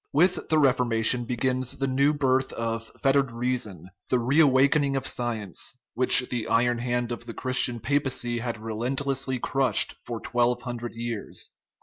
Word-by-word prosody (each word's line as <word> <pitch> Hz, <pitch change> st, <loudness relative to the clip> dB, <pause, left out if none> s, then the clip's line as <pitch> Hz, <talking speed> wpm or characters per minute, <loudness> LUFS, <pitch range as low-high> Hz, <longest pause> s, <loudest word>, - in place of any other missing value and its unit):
With 180 Hz, +5 st, +2 dB
the 160 Hz, -, +3 dB
Reformation 125 Hz, -3 st, +3 dB
begins 125 Hz, +1 st, -2 dB
the 135 Hz, -, -1 dB
new 135 Hz, +2 st, +2 dB
birth 135 Hz, -3 st, +1 dB
of 115 Hz, 0 st, -4 dB
fettered 135 Hz, -2 st, +3 dB
reason, 115 Hz, -8 st, -3 dB, 0.2 s
the 125 Hz, -, +3 dB
reawakening 140 Hz, +2 st, +3 dB
of 135 Hz, -, -2 dB
science, 115 Hz, -2 st, -3 dB, 0.2 s
which 125 Hz, 0 st, +5 dB
the 120 Hz, -3 st, -3 dB
iron 120 Hz, +1 st, +2 dB
hand 120 Hz, 0 st, -2 dB
of 120 Hz, 0 st, -6 dB
the 115 Hz, -, -7 dB
Christian 125 Hz, -2 st, +1 dB
papacy 125 Hz, -2 st, -1 dB
had 120 Hz, -1 st, -4 dB
re 110 Hz, +1 st, -6 dB
lentlessly 130 Hz, +2 st, -1 dB
crushed 135 Hz, +1 st, +2 dB
for 120 Hz, -1 st, -5 dB
twelve 120 Hz, +1 st, 0 dB
hundred 120 Hz, -2 st, -6 dB
years. 115 Hz, -2 st, -4 dB
125 Hz, 150 wpm, -26 LUFS, 120-135 Hz, 0.2 s, which